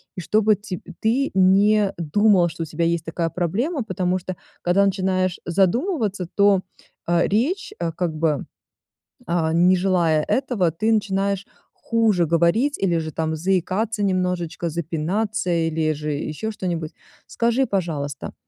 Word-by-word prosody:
и 180 - -5
чтобы 215 +3 +3
тебь 205 -2 -7 0.2
ты 255 +6 +1
не 195 +2 +4
думал, 180 +3 +3
что 165 - -5
у - - -4
тебя 165 +2 -2
есть 170 -1 0
такая 165 0 -2
проблема, 230 - -1
потому 185 -2 -1
что 185 +1 -6 0.3
когда 185 +3 +3
начинаешь 185 -2 0
задумываться, 200 - 0
то, 200 -2 +4 0.4
а, 170 0 +2
речь, 295 - 0
а, 170 -1 -1
как 165 -1 -3
бы, 155 -3 0 0.8
а, 165 -2 0
не 180 +2 +5
желая 170 -5 +2
этого, 240 -11 0
ты 215 +8 0
начинаешь 200 -2 0 0.3
хуже 220 -7 +1
говорить, 170 - +2
или 175 -3 +1
же 155 -1 -3
там 160 +1 -2
заикаться 195 +5 0
немножечко, 180 -3 -1
запинаться, 170 +5 -2
или 160 -2 +1
же 150 0 -4
еще 155 +9 -4
что-нибудь. 170 -6 -4 0.4
Скажи, 235 +3 +1
пожалуйста, 155 -7 -3
185 Hz, 140 wpm, -22 LUFS, 165-210 Hz, 0.8 s, не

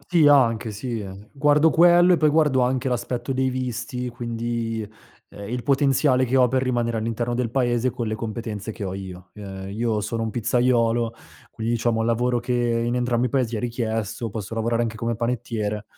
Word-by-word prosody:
Sì, 165 -4 +3
anche, 115 -6 +4
sì, 115 +2 -4
ehm, 100 +1 -10
guardo 150 +2 +4
quello 175 +1 +6
e - - +5
poi 155 -1 +3
guardo 150 -4 +3
anche 130 +1 0
l'aspetto 125 +1 -2
dei 130 0 +1
visti, 125 -1 -3
quindi, 115 -1 -3 0.4
ehm, 100 0 -9
il 125 0 -3
potenziale 135 -1 +3
che 130 +2 0
ho 125 -1 +6
per 130 +1 +1
rimanere 120 -2 0
all'interno 115 +2 -2
del 120 -2 -1
Paese 125 -1 +1
con 115 -1 -4
le 110 - -2
competenze 110 -1 -5
che - - -9
ho 95 - -3
io. 95 -1 -8
Che 105 - -13
io 100 +3 -3
sono 115 +2 -3
un 110 - -2
pizzaiolo, 120 0 +1 0.4
quindi 115 +1 -3
diciamo 115 -1 0
lavoro 120 +2 +1
che 125 +1 -3
in 120 0 0
entrambi 120 0 +1
i - - -2
Paesi 120 -4 0
è - - -3
richiesto, 115 -2 -3
posso 105 0 -6
lavorare 115 +1 0
anche 110 -1 -3
come 115 +1 -2
panettiere. 115 -3 -2
120 Hz, 190 wpm, -23 LUFS, 110-125 Hz, 0.4 s, quello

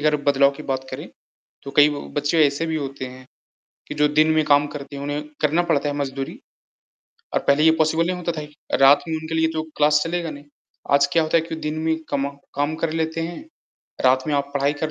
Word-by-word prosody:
अगर 150 0 +3
बदलाव 140 0 +5
की 150 - -8
बात 130 -2 -3
करें। - - -7 0.6
तो 140 - -7
कई 145 0 +8
ब 145 -1 -4
बच्चे 150 +2 +3
ऐसे 140 +3 -1
भी 160 -1 -2
होते 135 -3 -4
हैं 130 0 -11 0.6
कि - - -5
जो 150 0 +3
दिन 155 +2 +3
में 155 0 +2
काम 145 0 +4
करती 140 -1 -7
हैं 140 - -6
उन्हें 145 +1 -3 0.2
करना 155 +3 +2
पड़ता 145 +1 +2
है 145 - -2
मज़दूरी। 135 -1 -4 1.0
और - - +2
पहले 140 +2 +4
ये 160 - +7
पॉसिबल 160 +1 +2
नहीं 185 - -1
होता 175 -1 -2
था 160 -2 -5
ही 150 0 -11 0.3
रात 135 +2 +7
में 160 - -1
उनके 160 +1 -4
लिए 160 0 +3
तो 160 - -1 0.2
क्लास 150 0 +4
चलेगा 170 0 -2
नहीं। 145 0 -11 0.5
आज 140 0 +5
क्या 165 - +4
होता 155 +1 +2
है - - +2
कि 165 0 -6
दिन 150 +1 -2
में 160 0 +1
कमा 140 -1 -1 0.3
काम 145 +2 0
कर 165 - +1
लेते 160 0 -1
हैं। 170 +1 -5 0.7
रात 130 0 +4
में 150 - +1
आप 140 0 -1
पढ़ाई 140 0 +2
कर 155 - 0
150 Hz, 235 wpm, -22 LUFS, 140-160 Hz, 1.0 s, कई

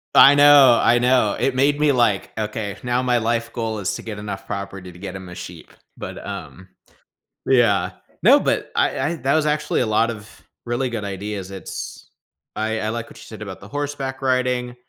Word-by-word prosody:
I 140 +1 +9
know, 145 -4 +7
I 120 - +4
know. 125 -4 +3
It 135 - 0
made 145 +3 +2
me, 150 -1 +4
like, 120 -7 +1
"Okay. 105 -2 -4
Now 125 0 0
my 125 -1 +2
life 115 0 -1
goal 110 -3 -3
is 95 - -2
to - - -7
get 110 -3 -6
enough 100 -2 -6
property 100 -2 -6
to 90 - -15
get 95 -1 -7
him 95 -1 -8
a 90 - -9
sheep." 85 -2 -10 0.3
But, - - -7
um 95 +1 -8 0.8
yeah. 120 -6 +3 0.3
No, - - +7
but - - -1
I - - +1
I 170 +3 -1
that 135 +1 0
was 155 -1 +2
actually 150 0 0
a - - +1
lot 110 +2 +2
of 110 0 -12 0.2
really 120 +2 -1
good 115 -3 -4
ideas. 100 -1 -5
It's 95 -3 -8 0.5
I 110 +1 -1
I 110 - -2
like 115 +1 -4
what - - -14
you - - -12
said 110 - -11
about 100 -3 -7
the 100 - -11
horseback 140 -1 -4
riding. 125 -1 0
115 Hz, 200 wpm, -21 LUFS, 100-130 Hz, 0.8 s, I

